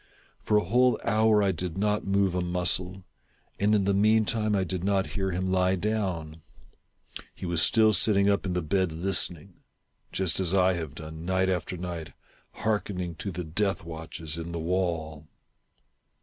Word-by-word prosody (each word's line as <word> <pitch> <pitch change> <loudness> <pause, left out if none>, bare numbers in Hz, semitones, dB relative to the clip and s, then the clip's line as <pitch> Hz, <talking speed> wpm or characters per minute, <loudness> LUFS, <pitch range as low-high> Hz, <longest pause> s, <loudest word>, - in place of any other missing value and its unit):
For 105 - +1
a 105 - +2
whole 125 +5 +3
hour 110 -2 +3
I 100 - +2
did 90 0 -4
not 105 +1 0
move 100 -1 +2
a 90 - 0
muscle, 90 +1 0 0.6
and 105 +2 +3
in 100 - +2
the 100 - +2
meantime 110 +1 +2
I 95 - +1
did 90 0 -4
not 100 -1 0
hear 95 -2 -1
him 90 +1 -2
lie 95 0 +2
down. 90 -6 -3 0.9
He - - -7
was 85 -2 0
still 110 +3 +4
sitting 100 -1 +4
up 100 -1 +2
in 90 - -2
the 90 -1 -1
bed 90 +3 0
listening; 90 +1 -1 0.3
— - - -46
just 95 -2 0
as 95 0 0
I 95 0 +4
have 80 -5 -5
done, 80 0 -8
night 95 +1 +1
after 90 0 -2
night, 85 -2 -6 0.5
heark 105 -4 +1
ening 90 -4 -5
to 100 - -3
the 90 0 -5
death 95 +3 -1
watches 80 0 -6
in 85 +1 -6
the 85 - -3
wall. 80 -3 -2
95 Hz, 180 wpm, -27 LUFS, 85-100 Hz, 0.9 s, still